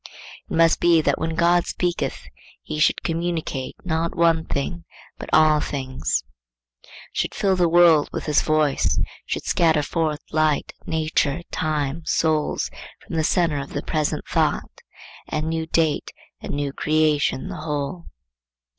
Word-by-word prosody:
It - - -3
must 165 0 +4
be 170 -1 +5
that - - +1
when 160 0 -2
God 175 +1 +3
speaketh 175 -1 -2 0.4
he 155 - -5
should 155 - +2
communicate, 165 -5 -2
not 165 -1 -1
one 165 -1 +3
thing, 165 +5 -3 0.4
but - - -7
all 155 -1 +5
things; 130 - -2 0.9
should - - -2
fill 195 -1 +2
the 175 -2 +2
world 165 -3 +5
with - - -4
his 150 -2 +3
voice; 155 -2 +1 0.3
should - - -3
scatter 160 -3 +3
forth 155 -1 -1
light, 155 -1 +1
nature, 155 -1 0
time, 150 0 -1
souls, 155 -1 0 0.3
from - - -6
the 160 - +1
centre 165 -3 +1
of 140 - -7
the 145 - -3
present 155 -2 -1
thought; - - -1 0.5
and 155 +1 -2
new 160 0 -2
date 160 -2 +1 0.3
and - - -4
new 145 -1 -2
create 155 -1 +2
the 130 - -6
whole. 150 +2 -4
155 Hz, 145 wpm, -23 LUFS, 150-165 Hz, 0.9 s, be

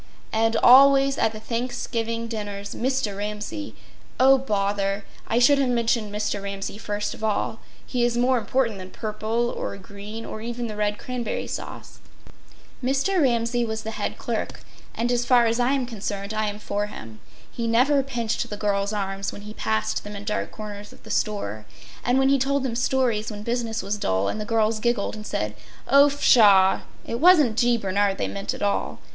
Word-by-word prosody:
And 225 +1 +2
always 275 +1 +6
at - - +2
the 215 - -8
Thanksgiving 230 0 -3
dinners 205 -3 -5
Mr. 255 -5 -1
Ramsay— 210 +8 -5 0.4
Oh, 265 +1 +6
bother! 200 -4 -1 0.2
I 230 - 0
should 275 +4 +5
have 270 -2 +2
mentioned 230 -3 +1
Mr. 210 -1 -2
Ramsay 200 +1 -5
first 210 -1 -3
of - - -11
all. 220 +1 -1 0.3
He 245 -2 -1
is 240 0 +1
more 250 +1 +3
important 230 -1 0
than 185 0 -8
purple 220 +3 -2
or - - -4
green, 205 +3 -9
or 215 - -7
even 240 +1 -4
the 215 -2 -5
red 210 0 0
cranberry 250 -3 -4
sauce. - - -7 0.8
Mr. 275 +9 +1
Ramsay 240 -2 +1
was 220 -1 -3
the 220 - -4
head - - -3
clerk; - - -4 0.3
and 240 +1 0
as 245 0 +1
far 240 -1 +5
as 230 +1 +1
I 245 +2 +2
am 270 -2 0
concerned 205 -3 -5
I 215 0 0
am 205 0 -4
for 205 0 -2
him. 110 - -10 0.3
He 230 -1 -3
never 260 +5 +4
pinched 240 -5 -2
the 210 - -5
girls’ 200 -1 0
arms 195 -1 -2
when 205 - -9
he 210 +1 -8
passed 110 - -1
them 205 0 -8
in 200 - -7
dark 210 0 -2
corners 210 -1 -8
of - - -17
the - - -8
store; 110 - -2 0.4
and 245 +2 +2
when 270 0 +4
he 275 0 +4
told 275 +1 +1
them 245 -3 -2
stories 245 -3 +1
when 210 -1 -7
business 230 -2 -2
was 205 +2 -2
dull 95 - 0
and 215 - -3
the - - -4
girls 220 -1 +1
giggled 235 -2 0
and 215 0 -8
said: 105 0 -2 0.3
“Oh, 280 +2 +6
pshaw!” 205 -9 +5 0.2
it 230 - -3
wasn’t 310 -9 +6
G. 240 0 +3
Bernard 200 -1 0
they - - -1
meant 200 0 -4
at - - -6
all. 205 - -1
220 Hz, 190 wpm, -24 LUFS, 205-245 Hz, 0.8 s, always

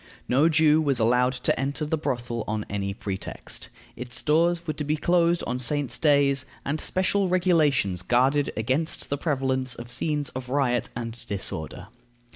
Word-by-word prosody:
No 140 +6 +4
Jew 155 -1 +4
was 140 -4 +1
allowed 125 +3 +3
to 125 -1 -1
enter 140 +3 -1
the 150 - 0
brothel 120 -6 -3
on 105 0 -2
any 100 -1 -3
pretext. 100 -1 -5 0.3
Its 125 0 -5
doors 170 +3 +2
were 155 - -2
to 150 - -4
be 150 +2 0
closed 170 +1 +2
on 125 +1 -2
saints' 135 -1 -1
days, 140 -3 +3 0.2
and 150 +2 -2
special 190 +1 +1
regulations 155 - +2
guarded 135 +6 +2
against 130 +10 -1
the 140 - +1
prevalence 130 -4 0
of 120 +1 -9
scenes 150 0 -1
of 130 -1 -7
riot 130 -3 +1
and 115 -1 -6
disorder. 95 -2 -3
135 Hz, 160 wpm, -25 LUFS, 120-155 Hz, 0.3 s, No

